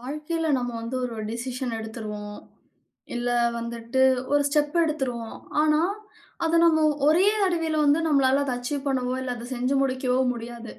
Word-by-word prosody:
வாழ்க்கையில 305 +5 -3
நம்ம 245 0 -3
வந்து 230 +3 -4
ஒரு 240 -2 -4 0.2
டெசிஷன் 245 +1 -4
எடுத்துருவோம், 215 -2 -6 0.8
இல்ல 240 0 -1 0.3
வந்துட்டு 235 +2 -2 0.3
ஒரு 290 0 +4
ஸ்டெப் 295 +2 0
எடுத்துருவோம். 255 -7 -3 0.2
ஆனா, 305 0 +3 0.6
அதை 330 0 +2
நம்ம 315 -2 +4 0.2
ஒரே 330 +6 +5 0.2
தடவையில 330 -4 +1
வந்து 290 +2 +4
நம்மளால 275 -2 +3
அதை 260 -3 -1
அச்சீவ் 275 +3 -4
பண்ணவோ, 255 -2 0
இல்ல 250 -1 -3
அதை 235 - -8
செஞ்சு 250 +2 0
முடிக்கவோ 260 -1 0
முடியாது. 235 0 -8
260 Hz, 145 wpm, -25 LUFS, 240-300 Hz, 0.8 s, ஒரே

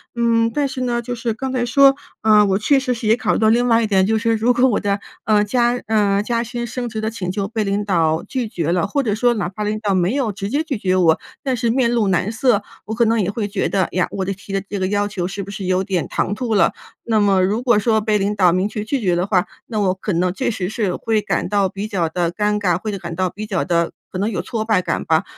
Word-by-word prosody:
嗯。 230 -1 +2
但 290 -1 +1
是 260 -1 -5
呢， 240 -1 0
就 245 +1 -5
是 230 -1 -2
刚 265 +4 -4
才 250 -2 0
说， 275 +3 +5 0.3
呃 210 -1 +5
我 195 0 +1
确 275 +5 +3
实 255 -2 -1
是 225 -2 -4
也 220 - +5
考 - - 0
虑 - - 0
到 220 -1 +4
另 240 +2 +3
外 230 0 +4
一 220 - 0
点， 190 -2 +3
就 220 +1 +1
是 230 0 +1
如 235 +3 +2
果 250 +2 +4
我 220 - +1
的 200 0 -1 0.2
呃 210 -1 +3
加 240 +3 +1
呃 205 -2 +2
加 235 +2 -1
薪 240 0 -5
升 245 +1 -4
职 220 -1 -4
的 220 - -1
请 185 -5 -4
求 195 0 -2
被 220 0 -2
领 200 +1 -1
导 165 -4 +1
拒 250 -4 -2
绝 170 -5 -2
了， 180 +1 +1
或 280 +8 0
者 215 -6 -1
说 240 +2 +2
哪 180 -5 -2
怕 210 +2 -5
领 215 +1 -2
导 205 -3 0
没 180 +3 +1
有 265 -6 0
直 200 +1 -5
接 290 +5 0
拒 285 -6 -3
绝 185 -2 0
我， 165 -3 +3 0.2
但 260 -2 -1
是 235 0 0
面 240 -1 +2
露 230 -4 +1
难 185 +3 +1
色， 225 -2 +2 0.2
我 220 - -4
可 235 +1 +2
能 230 +1 +2
也 195 +1 -1
会 210 -1 -3
觉 200 -1 -1
得， 190 -3 +1
呀， 180 0 +2
我 190 - -3
的 195 - -2
提 195 +1 -10
的 195 - 0
这 205 - -3
个 185 - 0
要 205 0 +1
求 185 -4 -3
是 195 +1 -5
不 200 - -10
是 195 -1 -6
有 185 +1 +1
点 185 -4 -1
唐 205 - -1
突 235 -2 -2
了？ 200 - +3 0.3
那 225 -2 +2
么 195 -2 +3
如 210 +5 0
果 235 -4 +4
说 220 0 +2
被 210 -1 +1
领 205 +1 -1
导 185 -3 +4
明 185 +2 +1
确 210 -1 -4
拒 255 +5 -2
绝 180 -4 +1
的 175 +1 0
话， 190 -2 +2 0.2
那 215 -3 -2
我 190 -2 +2
可 190 +2 -4
能 175 +1 +1
确 260 +6 -1
实 185 -4 -3
是 210 -5 -1
会 220 -2 0
感 200 - -2
到 200 -2 +2
比 200 +3 -5
较 185 -6 -1
地 170 0 -1
尴 210 +3 0
尬， 180 -3 +1
或 220 - -4
者 200 - -4
感 170 -1 -6
到 185 0 0
比 210 +4 -7
较 200 -5 -1
地 170 -1 +1 0.2
可 185 - -5
能 205 +3 0
有 195 - -2
挫 225 -2 -3
败 220 -4 +2
感 - - -2
吧。 160 0 +2
210 Hz, 310 characters per minute, -20 LUFS, 190-230 Hz, 0.3 s, 说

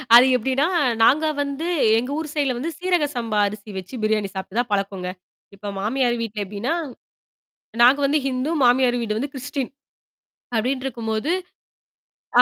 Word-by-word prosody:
அது 245 - +9
எப்ப்டின்னா, 265 +5 +1 0.4
நாங்க 295 +7 +5 0.2
வந்து 285 +3 -3 0.3
எங்க 250 +4 -4
ஊர் 315 -1 -4
சைட்ல 285 -4 +1
வந்து 285 +7 -3
சீரக 355 -3 +1
சம்பா 225 -3 -1
அரிசி 210 +1 -8
வச்சு 190 +6 -8
பிரியாணி 215 -2 +1
சாப்ட்டு 190 +2 -5
தான் 245 -1 -1
பழக்கங்க. 195 -2 -2 0.5
இப்ப 205 +1 -7
மாமியார் 240 +4 +1
வீட்ல 215 -2 -3
எப்டின்னா, 210 - -2 1.1
நாங்க 255 +4 +7
வந்து 295 +2 +2
ஹிந்து, 260 +2 -1
மாமியார் 245 0 +4
வீடு 215 -2 -2
வந்து 275 +4 -3
கிரிஸ்டின். 275 0 -4 0.9
அப்டின்ட்ருக்கும்போது, 240 0 -1 1.1
ஆ - - +11
245 Hz, 140 wpm, -22 LUFS, 215-275 Hz, 1.1 s, ஆ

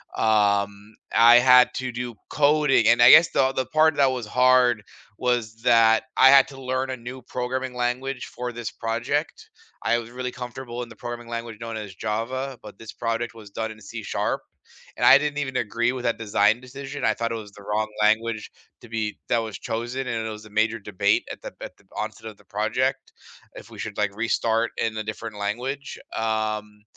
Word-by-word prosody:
Um, 100 -1 +1 0.2
I 120 +1 +8
had 125 0 +6
to 130 -1 -3
do 120 -1 -5
coding, 145 -5 +3
and 120 +1 +5
I 120 - +9
guess 165 - +8
the 135 -1 +2
the 130 -1 -2
part 155 +4 +3
that 135 -2 +4
was 125 -3 -4
hard 125 0 +4 0.4
was 120 -3 -1
that 115 -2 +5
I 130 - +7
had 135 0 +7
to 135 -1 -11
learn 130 +1 -2
a 130 - -2
new 125 +2 -8
programming 125 +1 -3
language 125 +2 -2
for 125 -1 -4
this 115 -3 -5
project. 120 +7 -3 0.3
I 120 - +2
was 115 -1 -9
really 125 +1 -5
comfortable 125 -1 -7
in 120 - -10
the 115 - -12
programming 120 +1 -7
language 115 -2 -6
known 115 0 -6
as 105 -3 -7
Java, 120 +6 -3
but 105 -2 -11
this 110 -2 -9
project 115 0 -2
was 110 -3 -13
done 110 +1 -3
in 110 0 -13
C#, - - -3 0.6
and - - +1
I 135 - +9
didn't 145 0 -2
even 130 -3 -2
agree 120 +1 0
with 130 -2 -6
that 115 - 0
design 105 0 +2
decision, 135 +2 -6
I - - +3
thought 115 0 -3
it - - -2
was 105 -2 -8
the 100 - -14
wrong 105 +2 -1
language 110 +1 +1 0.3
to 120 - -14
be 110 -2 -3
that - - +3
was 110 -4 -5
chosen, 120 +4 -4
and 110 -2 -2
it - - -3
was 105 0 -8
a - - -13
major 110 +2 +1
debate 100 0 0
at - - -9
the - - -8
at - - -8
the 100 - -26
onset 110 +1 -5
of 110 - -12
the - - -22
project, 130 +6 -1 0.4
if - - -12
we - - -12
should, 105 - -5
like, 105 -2 0
restart 115 +1 0
in 110 -1 -1
a 110 - -2
different 110 0 -6
language. 125 +7 -4 0.2
Um, 110 -1 -2
115 Hz, 200 wpm, -24 LUFS, 110-130 Hz, 0.6 s, I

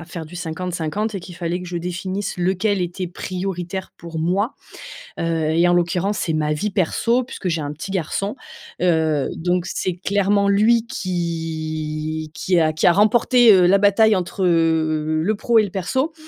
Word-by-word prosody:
à - - -8
faire 165 -1 -7
du 175 +3 -10
50-50 175 +4 -3
et 195 - -3
qu'il 175 0 -10
fallait 175 +1 -3
que 180 - -8
je 175 -1 -3
définisse, 185 +3 -4
lequel 185 +2 0
était 180 +1 -4
prioritaire 185 +1 -5
pour 165 -1 -7
moi, 190 - 0 0.7
heu, - - -1 0.3
et 170 +2 +3
en 175 - +3
l'occurrence 175 +3 0
c'est 160 - -1
ma 150 -1 0
vie 210 +8 -2
perso 230 +6 +1
puisque 235 - -6
j'ai 165 -2 -1
un 145 0 -4
petit 155 +6 -8
garçon. 195 - -2 0.4
Heu, 160 -5 +1
donc 175 +1 -1
c'est 185 -2 -2
clairement 200 +2 +1
lui, 225 +3 +3
qui 155 -3 -3
qui 180 +1 +1
a 155 -1 +2
qui 155 - -1
a - - +7
remporté, 230 +4 +5
heu, 185 -2 +5
la 195 +3 +5
bataille 205 +2 +4
entre, 185 +1 -2
heu, 155 -2 +1
le 215 +3 +1
pro 235 +3 +1
et 220 - +6
le 200 - -4
perso. 260 - -1
180 Hz, 180 wpm, -21 LUFS, 165-200 Hz, 0.7 s, a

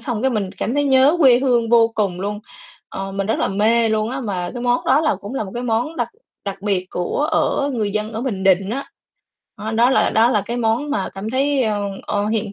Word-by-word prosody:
xong 235 -2 -3
cái 265 - +2
mình 205 -6 -2
cảm 240 - -2
thấy 290 0 +1
nhớ 270 +4 +4
quê 255 -4 +6
hương 245 -3 +1
vô 230 -1 +5
cùng 195 -4 -1
luôn, 205 +1 -3 0.5
ờ, 195 0 -6
mình 195 0 -2
rất 220 - 0
là - - +1
mê 225 +4 +2
luôn 215 +1 0
á 265 +1 -4
mà 185 -6 -3
cái 245 - -5
món 245 0 +1
đó 270 +3 +4
là 310 -8 +1
cũng 205 +6 -7
là 245 - -2
một 190 - -8
cái 240 - -3
món 245 +7 -1
đặc - - -1 0.4
đặc 195 -1 -6
biệt 195 -3 -1
của 285 - -1
ở 285 -2 +1
người 215 -4 -1
dân 215 +1 -2
ở 220 - -4
Bình 210 -7 -3
Định 190 +1 +3
á. 275 +4 -3 0.7
Đó, 220 +1 -4
đó 235 +3 +4
là 265 - +3
đó 225 +2 +4
là 210 -5 +1
cái 240 - -3
món 240 +5 0
mà 295 - -1
cảm 200 +3 -5
thấy, 270 +1 +1
ờ, 210 -2 -1 0.2
ờ, 205 0 -1
hiện 215 -1 -2
225 Hz, 250 wpm, -20 LUFS, 205-255 Hz, 0.7 s, quê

